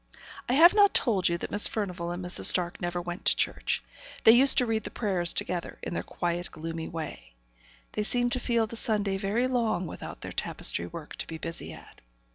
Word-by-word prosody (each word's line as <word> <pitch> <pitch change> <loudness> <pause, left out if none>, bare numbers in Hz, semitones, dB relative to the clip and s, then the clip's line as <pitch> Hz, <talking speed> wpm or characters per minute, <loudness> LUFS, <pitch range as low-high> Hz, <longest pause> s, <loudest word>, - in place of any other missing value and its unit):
I - - +2
have 330 +6 +7
not 410 -1 +4
told 200 -8 +3
you 170 - 0
that - - -6
Miss 205 - +3
Furnivall 180 -5 -4
and 175 +1 -5
Mrs. 180 - +1
Stark 175 -1 +2
never 175 0 -2
went 175 +3 -6
to - - +5
church; - - -1 0.4
they 225 - +9
used 260 +4 +6
to 250 - +5
read 225 -1 -1
the - - -4
prayers 185 -6 0
together, 175 -1 -3
in - - -4
their - - -2
quiet, 175 0 -3
gloomy 165 0 -6
way; 150 - -7 0.6
they 215 - -2
seemed 245 +3 +1
to 255 - 0
feel 235 -2 +1
the 220 - -9
Sunday 205 -3 +1
very 205 +5 0
long 230 -8 0
without 160 - -8
their - - -7
tapestry 85 - 0
work 155 - -9
to - - -5
be 165 - -6
busy 165 +1 -5
at. - - -15
190 Hz, 210 wpm, -28 LUFS, 170-230 Hz, 0.6 s, they